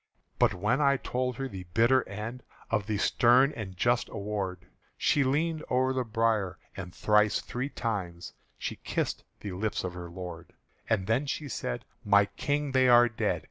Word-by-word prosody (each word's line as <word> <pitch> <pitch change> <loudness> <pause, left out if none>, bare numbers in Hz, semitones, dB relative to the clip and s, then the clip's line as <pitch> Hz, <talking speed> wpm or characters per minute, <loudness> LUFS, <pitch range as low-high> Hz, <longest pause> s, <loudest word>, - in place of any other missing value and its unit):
But - - +4
when 105 +10 +1
I 140 -1 +4
told 125 -1 -2
her 135 +2 -3
the 95 -7 -8
bitter 120 +3 +4
end 110 +5 -5 0.3
Of 105 -1 0
the 110 -2 0
stern 125 +7 +4
and 95 -5 -6
just 120 +4 +2
award, 100 -3 -4 0.3
She 145 - +3
leaned 155 +4 0
o'er 130 +1 +2
the 130 -1 0
bier, 110 -4 0 0.2
and 90 -2 -6
thrice 105 +2 +3
three 130 +3 -4
times 95 -10 -4 0.2
She - - -4
kissed - - -2 0.2
the 100 - -5
lips 105 +4 -2
of 90 -1 -3
her 90 -1 -7
lord. 85 -2 -8 0.4
And 100 -5 +1
then 125 +7 +1
she 145 +1 -3
said, 60 - -4 0.2
"My 100 0 +5
King, 145 +6 -2
they 130 -1 +4
are 120 0 +7
dead!" 110 - -1
115 Hz, 175 wpm, -29 LUFS, 95-130 Hz, 0.4 s, are